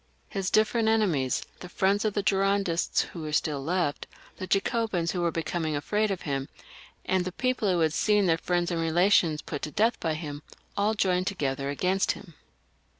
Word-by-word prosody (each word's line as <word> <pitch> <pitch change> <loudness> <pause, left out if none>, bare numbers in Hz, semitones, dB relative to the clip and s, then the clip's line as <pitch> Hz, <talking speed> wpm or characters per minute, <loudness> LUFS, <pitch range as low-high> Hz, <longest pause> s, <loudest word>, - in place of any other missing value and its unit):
His 195 -1 -2
different 220 +1 +2
enemies, 180 - +1 0.2
the 180 - -9
friends 195 +4 +1
of 210 - 0
the 205 - 0
Girondists 195 -3 +1
who 170 - -6
were 155 -1 -5
still 150 -2 0
left, 160 -2 -1 0.3
the 185 - -5
Jacobins* 195 -4 0
who 180 - -2
were 170 - +2
becoming 160 -1 -2
afraid 210 +9 0
of 195 -3 -3
him, 135 -2 -3 0.6
and 185 -1 +1
the 185 - -4
people 255 -2 0
who 175 -2 +1
had 160 -1 +2
seen 210 +1 +3
their 165 -2 +2
friends 175 0 0
and 165 -1 -1
relations 165 -2 +3
put 145 - -5
to - - -3
death 225 +9 +1
by 160 -2 -1
him, 150 -2 -6 0.3
aU 210 +2 +1
joined 185 -2 +1
together 140 -7 -2
against 185 +7 +1
him. 170 - -13
180 Hz, 185 wpm, -27 LUFS, 160-200 Hz, 0.6 s, seen